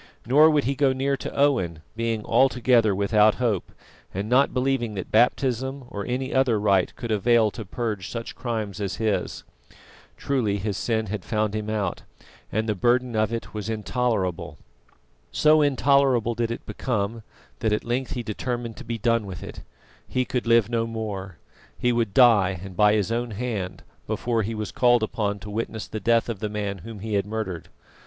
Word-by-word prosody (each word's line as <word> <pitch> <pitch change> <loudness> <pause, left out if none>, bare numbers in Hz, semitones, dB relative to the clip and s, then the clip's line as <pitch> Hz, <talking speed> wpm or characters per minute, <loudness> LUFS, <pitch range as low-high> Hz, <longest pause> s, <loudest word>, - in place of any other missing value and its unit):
Nor 150 +7 +6
would 150 -2 +2
he 135 - 0
go 135 -1 +2
near 135 +1 0
to - - -6
Owen, 95 - +1
being 115 -2 -2
altogether 125 -5 +3
without 105 +2 +4
hope, 115 -7 -1 0.4
and 100 +3 -4
not 130 +4 +4
believing 125 -4 0
that 95 - -6
baptism 130 +3 +1
or 100 -1 -5
any 130 +2 -2
other 130 -5 +3
rite 100 -3 +2
could 120 -2 -5
avail 110 +1 +3
to 110 - -7
purge 105 -2 -4
such 115 -1 -5
crimes 110 -4 -4
as 95 -3 -2
his. 100 -2 -2 0.7
Truly 120 -8 0
his 100 0 -3
sin 110 +3 -1
had 105 -2 -4
found 110 0 -1
him 110 0 -3
out, 105 -4 -2 0.5
and 110 +3 -1
the 105 - +1
burden 120 +4 +1
of 110 0 +1
it 115 0 -5
was 105 0 -4
intolerable. 110 -4 -1 0.7
So 155 0 +4
intolerable 135 -4 +3
did 115 0 -1
it 115 - -5
become, 115 -2 -2 0.4
that 110 - 0
at 105 - 0
length 125 +2 -2
he 120 - -3
determined 120 +1 -4
to 135 - -8
be 115 -1 -4
done 115 -1 +1
with 90 -2 -7
it. - - -8 0.5
He 130 0 0
could 125 -1 -3
live 115 -3 +5
no 115 -1 -1
more. 100 -5 -5 0.4
He 125 - +1
would 115 -4 -1
die, 100 -8 +5
and 95 -2 -9
by 105 +2 +5
his 105 0 0
own 120 +1 -1
hand, 105 -4 -4 0.2
before 115 -2 0
he 110 +2 -3
was 105 -1 -4
called 120 -2 +3
upon 105 -2 -1
to 105 - -8
witness 110 0 -3
the 110 - -5
death 115 +3 +2
of 115 -5 -4
the 105 0 -3
man 100 -2 -3
whom 105 +3 -9
he 110 0 -4
had 100 0 +1
murdered. 105 -6 -4
110 Hz, 185 wpm, -25 LUFS, 105-125 Hz, 0.7 s, Nor